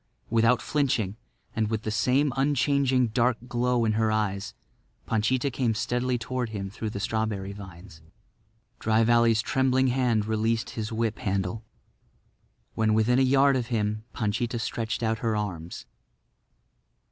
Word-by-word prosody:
Without 115 +2 +3
flinching 120 -9 0 0.4
and 110 -1 0
with 110 -1 -2
the 110 - -2
same 125 +5 +2
unchanging 135 -2 +2
dark 120 +1 +2
glow 125 -1 +1
in 110 - +2
her 110 0 +1
eyes, 105 -1 -2 0.5
Panchita 125 +5 0
came 120 -2 0
steadily 125 +3 0
toward 120 +1 -3
him 100 -3 -5
through 110 +1 -4
the 105 - -5
strawberry 110 -2 -2
vines. 90 -4 -12 0.8
Dry 110 +1 +2
Valley's 115 -1 +4
trembling 130 0 +2
hand 120 -4 +1
released 110 +2 0
his 110 -1 -4
whip 115 -1 -1
handle. 100 -1 -2 1.1
When 110 -1 +2
within 120 +3 +3
a - - +4
yard 135 +1 +4
of 125 -3 -1
him 110 -2 -1
Panchita 115 +2 -2
stretched 115 0 -3
out 110 0 0
her 115 -1 0
arms. 90 -5 -5
115 Hz, 140 wpm, -26 LUFS, 110-125 Hz, 1.1 s, Valley's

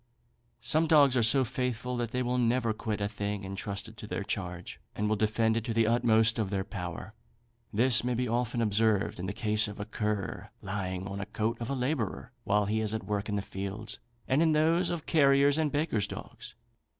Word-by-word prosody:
Some 155 +7 +3
dogs 145 -5 +5
are 125 - +3
so 125 +4 +4
faithful 125 0 -2
that 120 -2 -2
they 125 +2 -1
will 125 +1 0
never 115 -1 +2
quit 110 -1 -3
a 100 - +1
thing 100 -1 -4
entrusted 100 +2 -5
to 105 - -8
their 100 - -3
charge, 90 -3 -5 0.2
and 105 - -1
will 110 - +2
defend 110 +1 +1
it 115 - -1
to 115 - -2
the 115 0 +4
utmost 115 0 +3
of 105 -3 0
their 95 -1 -1
power. 95 +1 -6 0.6
This 120 +3 +4
may 125 0 0
be 125 +1 0
often 120 0 0
observed 110 -2 +2
in 90 - -3
the - - -2
case 110 0 +1
of 105 0 -8
a 105 - -3
cur, 105 -2 -3
lying 95 -2 -3
on 100 0 -5
the 100 - -5
coat 110 +2 -1
of 115 - -3
a 140 - -1
labourer 125 -4 -2
while 105 +1 +2
he 110 +2 0
is 110 0 -1
at 110 - -5
work 105 0 -2
in 105 - -1
the 100 - -1
fields, 100 +3 -5 0.3
and 135 +4 +3
in 160 -1 +4
those 165 +4 +3
of 170 -3 -3
carriers' 140 -1 +4
and 155 -2 +1
bakers' 145 -9 0
dogs. - - -9
110 Hz, 210 wpm, -30 LUFS, 105-125 Hz, 0.6 s, dogs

